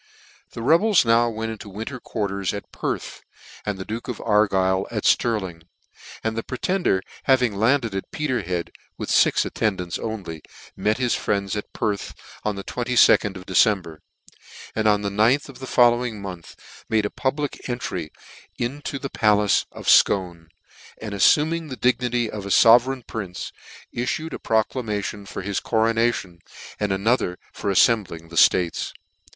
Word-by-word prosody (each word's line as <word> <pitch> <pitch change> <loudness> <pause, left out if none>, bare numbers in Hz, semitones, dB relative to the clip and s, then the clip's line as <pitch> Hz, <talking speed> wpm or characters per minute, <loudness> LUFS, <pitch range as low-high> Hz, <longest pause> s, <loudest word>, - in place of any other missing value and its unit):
The 115 - -6
rebels 170 - +4
now 115 +1 +4
went 115 0 -4
into 110 -2 -9
winter 110 +7 -6
quarters 100 -4 -3
at 100 - -8
Perth, - - -4 0.5
and 105 -2 -1
the 95 - -6
duke 115 +2 -5
of 125 -4 -5
Argyle 95 -3 +2
at 105 -3 -4
Stirling; 95 -8 +1 0.6
and 110 0 -1
the 115 - -1
Pretender 130 - -1 0.2
having 125 -5 +3
landed 115 +1 +2
at 95 - -4
Peterhead, 120 - -2 0.3
with - - -4
fix - - +4
attendants 95 -5 -2
only, 95 -8 -5 0.3
met 105 +3 0
his 125 -2 +1
friends 100 0 -1
at 105 - -5
Perth 105 -2 -3 0.3
on 105 -1 -1
the 100 - -6
22d 120 -4 +3
of 90 - -11
December; 95 -4 +2 0.8
and 110 -1 +1
on 105 -1 +3
the 100 - -1
ninth 115 +8 +2
of 130 -2 -12
the 130 - -7
follow 120 -1 +4
ing 115 -4 -4
month 90 -4 -8 0.3
made 110 -2 +2
a 105 - -2
public 140 0 -3
entry 90 -10 -4 0.5
into 140 +3 -3
the 140 - -4
palace 105 -2 +3
of - - -10
JScone, 90 -4 +3 0.5
and 110 -2 -6
afiuming 155 - +3
the 130 - -5
dignity 125 -1 +1
of 105 -2 -6
a - - -5
iovereign 120 +4 +5
prince, 95 -5 -6 0.4
ifTued 155 +6 -2
a - - -5
proclamation 105 -3 -1
for 100 - -6
his 100 0 -1
coronation, 115 -5 0 0.4
and 105 -1 -1
another 95 -2 +1 0.2
for 100 - -3
afTembling 95 -5 +2
the - - -9
ftates. 85 +1 +3
110 Hz, 155 wpm, -23 LUFS, 100-120 Hz, 0.8 s, iovereign